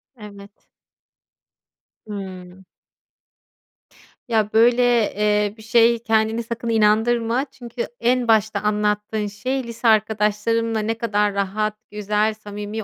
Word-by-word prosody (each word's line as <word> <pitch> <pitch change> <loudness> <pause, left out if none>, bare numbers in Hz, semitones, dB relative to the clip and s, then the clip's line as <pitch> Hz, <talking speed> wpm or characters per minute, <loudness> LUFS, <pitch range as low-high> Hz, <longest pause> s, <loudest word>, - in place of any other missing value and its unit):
Evet. 200 -2 -14 1.4
Hımm. 190 -2 -9 1.6
Ya, 220 -3 0
böyle, 235 +2 +4 0.3
eee, 210 0 +1
bir 220 - -13
şeye 235 +1 +4
kendini 225 0 0
sakın 230 0 -5
inandırma. 230 +3 +2
Çünkü 240 -1 -6
en 245 0 +1
başta 220 -2 +2
anlattığın 210 0 -1
şey, 255 +6 -3
lise 235 0 -4
arkadaşlarımla 220 +1 +1
ne 220 +2 -1
kadar 210 -3 0
rahat, 200 +2 -1 0.2
güzel, 210 +1 0
samimi 210 0 -7
215 Hz, 105 wpm, -21 LUFS, 210-230 Hz, 1.6 s, böyle